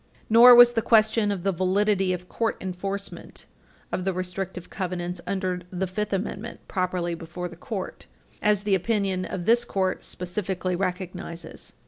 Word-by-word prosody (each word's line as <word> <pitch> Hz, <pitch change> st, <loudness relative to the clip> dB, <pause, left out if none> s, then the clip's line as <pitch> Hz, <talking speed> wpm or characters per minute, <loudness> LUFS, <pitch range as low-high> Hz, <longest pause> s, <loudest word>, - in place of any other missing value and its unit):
Nor 240 Hz, +2 st, +10 dB
was 240 Hz, 0 st, +9 dB
the 225 Hz, -, +1 dB
question 220 Hz, -1 st, +3 dB
of 190 Hz, -4 st, -3 dB
the 195 Hz, -, +2 dB
validity 190 Hz, +1 st, +1 dB
of 180 Hz, 0 st, -4 dB
court 225 Hz, +3 st, -1 dB
enforcement 195 Hz, +2 st, -5 dB, 0.5 s
of 185 Hz, -, -2 dB
the 190 Hz, 0 st, 0 dB
restrictive 185 Hz, 0 st, -4 dB
covenants 180 Hz, -2 st, -3 dB
under 185 Hz, -2 st, -1 dB
the 185 Hz, +1 st, -2 dB
Fifth 210 Hz, +3 st, -3 dB
Amendment 205 Hz, +3 st, -3 dB
properly 180 Hz, -2 st, -1 dB
before 170 Hz, +1 st, -6 dB
the 175 Hz, -, -11 dB
Court, 190 Hz, +2 st, -6 dB, 0.3 s
as 210 Hz, -1 st, +2 dB
the 205 Hz, -1 st, +1 dB
opinion 190 Hz, -1 st, 0 dB
of 180 Hz, -3 st, -5 dB
this 235 Hz, +2 st, +4 dB
Court 190 Hz, -5 st, -1 dB
specifically 185 Hz, 0 st, -3 dB
recognizes. 180 Hz, -2 st, -5 dB
190 Hz, 150 wpm, -25 LUFS, 180-210 Hz, 0.5 s, Nor